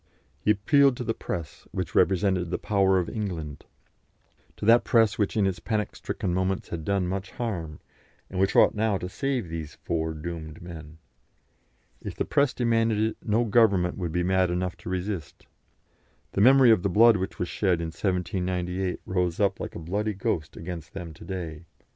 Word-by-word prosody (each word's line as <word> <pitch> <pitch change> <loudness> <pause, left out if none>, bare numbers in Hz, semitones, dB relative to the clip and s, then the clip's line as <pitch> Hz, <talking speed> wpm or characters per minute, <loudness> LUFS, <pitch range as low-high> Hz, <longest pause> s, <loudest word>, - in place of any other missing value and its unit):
He - - -2
appealed 130 +6 +4
to - - -3
the 115 -1 -1
press, 80 -8 -6
which - - -4
represented 95 -2 +2
the - - -1
power 95 -2 +2
of 90 - 0
England; 85 -9 -5 0.9
to - - -5
that 115 +2 +6
press 115 -3 +3
which 105 +1 0
in 105 - +3
its 95 -2 -1
panic 110 -2 -2
stricken 90 - -3
moments 95 +1 -1
had 80 -2 -5
done 100 +2 0
much 95 +1 -3
harm, 90 - -4 0.5
and 95 - -5
which 95 +1 +2
ought - - +6
now 105 -2 +1
to 90 - -5
save 130 +1 -2
these 80 -2 -6
four 80 -1 -1
doomed 80 0 -6
men. 80 -3 -10 1.0
If - - -6
the - - -1
press 140 -2 +2
demanded 115 -2 +1
it, 110 0 0
no 115 +2 +1
Government 100 -5 +3
would 90 -4 -3
be 90 +2 0
mad 95 0 +2
enough 90 0 -2
to - - -8
resist. 90 -4 -4 0.9
The 100 - 0
memory 130 +1 +7
of 110 -5 +4
the 100 - 0
blood 115 +4 +6
which 95 0 -4
was 90 - -2
shed 90 -1 +1
in 85 -1 -3
1798 90 0 -2
rose 90 -2 -1
up 100 -2 +1
like - - -6
a - - -4
bloody 100 +6 -2
ghost 80 -5 -2
against 85 -1 -7
them 85 -4 -6
to 75 - -13
day. 85 -4 -6
95 Hz, 185 wpm, -26 LUFS, 85-105 Hz, 1.0 s, memory